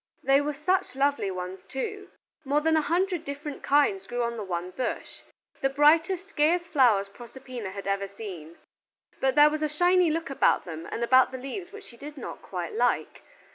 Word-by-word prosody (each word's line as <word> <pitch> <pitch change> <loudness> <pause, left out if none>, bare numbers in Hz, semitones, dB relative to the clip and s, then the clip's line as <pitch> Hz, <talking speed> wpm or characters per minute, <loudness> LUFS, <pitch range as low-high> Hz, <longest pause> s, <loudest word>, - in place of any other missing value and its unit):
They 275 +1 +4
were 295 0 -3
such 305 -1 0
lovely 280 -6 +1
ones 185 0 -6
too. 400 - -5 0.3
More 285 +1 +2
than 320 +1 +2
a 315 - +4
hundred 350 +2 0
different 285 0 -6
kinds 200 -10 +2
grew 245 0 -2
on 235 0 -2
the 220 - -5
one 180 -1 -4
bush: 255 +6 -4 0.4
the 270 - +2
brightest, 325 +7 +3
gayest 335 +4 +2
flowers 230 -9 +4
Proserpina 240 0 -9
had 200 +1 -7
ever 200 0 -1
seen. 185 -6 -9 0.6
But 265 0 +1
there 295 0 +7
was 310 0 -3
a 305 - 0
shiny 355 +3 +3
look 325 -2 -2
about 275 - +2
them 165 -1 -7
and 235 - -3
about 255 +2 +5
the 260 - -5
leaves 350 +9 -7
which 415 0 -10
she 235 - -15
did 295 +4 -10
not - - -7
quite - - -5
like. 440 - 0
275 Hz, 190 wpm, -27 LUFS, 210-310 Hz, 0.6 s, there